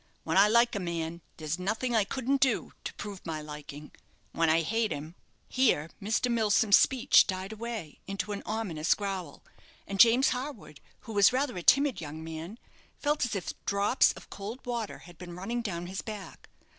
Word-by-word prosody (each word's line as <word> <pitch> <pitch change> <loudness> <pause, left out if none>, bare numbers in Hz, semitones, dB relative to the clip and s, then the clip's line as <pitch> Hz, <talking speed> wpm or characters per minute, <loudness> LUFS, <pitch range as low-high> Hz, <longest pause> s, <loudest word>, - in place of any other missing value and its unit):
When - - -2
I 195 +2 +7
like 235 +2 +4
a - - -1
man 170 -2 -4 0.2
there's 155 +2 -3
nothing 225 +6 -1
I 215 -3 +3
couldn't 265 +4 -1
do 260 -4 +1
to - - -4
prove 205 -3 -7
my 160 -2 -4
liking; 150 0 -9 0.4
when 165 -1 +1
I 160 +1 +4
hate 225 +5 0
him 155 +3 -5 0.2
" - - -40
Here 195 - +2
Mr. 220 +4 0
Milsom's 215 -2 +4
speech 260 -3 +5
died 190 +1 -4
away 220 -7 -6
into 195 +2 -3
an 200 - -4
ominous 180 -8 0
growl; 190 -7 -5 0.4
and 195 0 -5
James 240 +4 +7
Harwood, 250 - -6 0.2
who 225 - -9
was 200 -1 +6
rather 260 +1 0
a 180 - -4
timid 275 +4 +4
young 155 +1 -7
man, 165 +6 -7 0.4
felt 295 -2 +1
as 230 - -3
if 190 - -3
drops 200 +5 +3
of - - -14
cold 215 +6 -7
water 235 -3 -3
had 175 -2 -15
been 175 -1 -8
running 230 +7 -3
down 175 -6 -4
his 190 +2 -5
back. 210 -5 -9
200 Hz, 185 wpm, -29 LUFS, 170-235 Hz, 0.4 s, I